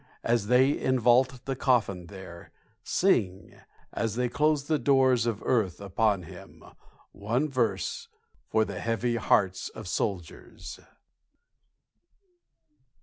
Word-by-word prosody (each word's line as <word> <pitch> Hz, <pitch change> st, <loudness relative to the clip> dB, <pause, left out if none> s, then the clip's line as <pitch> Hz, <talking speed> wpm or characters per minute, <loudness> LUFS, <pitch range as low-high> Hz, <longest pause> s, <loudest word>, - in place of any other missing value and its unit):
As 115 Hz, -3 st, 0 dB
they 130 Hz, +4 st, +4 dB
invault 130 Hz, 0 st, +2 dB
the 135 Hz, -, -2 dB
coffin 105 Hz, -9 st, 0 dB
there, 95 Hz, -3 st, -11 dB, 0.3 s
Sing 100 Hz, -, 0 dB, 0.4 s
as 115 Hz, -2 st, -2 dB
they 125 Hz, 0 st, 0 dB
close 150 Hz, +2 st, +1 dB
the 155 Hz, +1 st, 0 dB
doors 130 Hz, -2 st, +3 dB
of 115 Hz, -3 st, -3 dB
earth 110 Hz, -9 st, 0 dB
upon 100 Hz, 0 st, 0 dB
him 85 Hz, -, -13 dB, 0.5 s
one 115 Hz, +9 st, -1 dB
verse, 115 Hz, -9 st, -2 dB, 0.4 s
For 110 Hz, 0 st, +2 dB
the 100 Hz, -2 st, -6 dB
heavy 115 Hz, +1 st, -1 dB
hearts 95 Hz, -4 st, +1 dB
of 110 Hz, -3 st, -10 dB
soldiers. 90 Hz, -2 st, -5 dB
115 Hz, 110 wpm, -27 LUFS, 100-130 Hz, 0.5 s, they